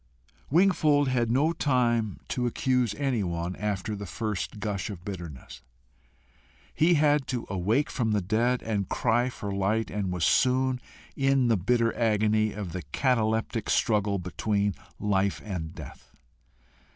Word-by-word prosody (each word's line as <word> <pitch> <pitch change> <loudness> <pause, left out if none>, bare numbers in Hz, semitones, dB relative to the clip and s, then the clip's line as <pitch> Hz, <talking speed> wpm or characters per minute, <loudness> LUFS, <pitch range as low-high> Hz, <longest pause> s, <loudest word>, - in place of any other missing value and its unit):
Wingfold 155 -4 +3
had 120 -3 +1
no 145 +7 +2
time 120 - +1
to 125 -1 0
accuse 125 -2 0
anyone 95 -11 -1
after 105 0 -2
the 100 -1 -7
first 105 0 -4
gush 100 -1 -3
of 90 -3 -8
bitterness. 85 -10 -8 1.1
He 170 +2 +4
had 150 -2 +3
to 125 -2 -3
awake 105 +10 +1
from 115 -4 0
the 105 - +2
dead 115 +6 0
and 105 -4 -2
cry 120 +1 +1
for 105 -5 -6
light, 105 +3 0
and 100 -3 -2
was 90 -3 0
soon 130 0 +2 0.3
in 135 -2 +2
the 115 - +4
bitter 115 +5 +1
agony 110 -1 +2
of 100 -4 -6
the 90 - -4
cataleptic 115 -3 0
struggle 105 -3 +2
between 100 +3 -1 0.3
life 100 -1 +1
and 90 -5 -5
death. - - -11
110 Hz, 140 wpm, -27 LUFS, 100-125 Hz, 1.1 s, He